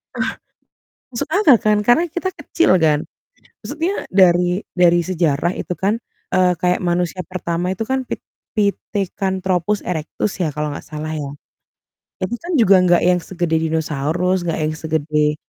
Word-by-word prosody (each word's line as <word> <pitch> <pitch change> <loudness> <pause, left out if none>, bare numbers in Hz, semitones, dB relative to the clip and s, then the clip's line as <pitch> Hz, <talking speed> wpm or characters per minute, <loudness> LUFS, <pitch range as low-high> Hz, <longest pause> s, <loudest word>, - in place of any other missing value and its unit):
Eh, - - 0 0.9
masuk 235 - -3
akal 320 - +6
kan, 215 -2 +3
karena 240 +8 +5
kita 355 +3 -2
kecil 340 - 0
kan? 150 -2 +2 0.6
Maksudnya 330 +7 -2
dari 180 0 +4 0.2
dari 175 -1 +5
sejarah 170 -2 0
itu - - -3
kan, 200 +5 0 0.4
eee, 185 -1 +4
kayak 180 0 +1
manusia 175 +1 0
pertama 180 0 -2
itu 190 - -9
kan 265 0 -1
Pit - - -5 0.3
Pithecanthropus 195 -2 -1
erectus 165 +3 -3
ya 175 - +1
kalau 150 +1 -2
nggak 145 - -7
salah 155 +1 -5
ya. 140 -2 -4 0.9
Itu 185 - -2
kan 345 - -6
juga 200 -6 +6
nggak 175 -1 +4
yang 180 0 +4
segede 170 -2 -1
dinosaurus, 160 +3 0
nggak 165 - -1
yang 155 - 0
segede 155 -1 0
180 Hz, 145 wpm, -19 LUFS, 160-200 Hz, 0.9 s, akal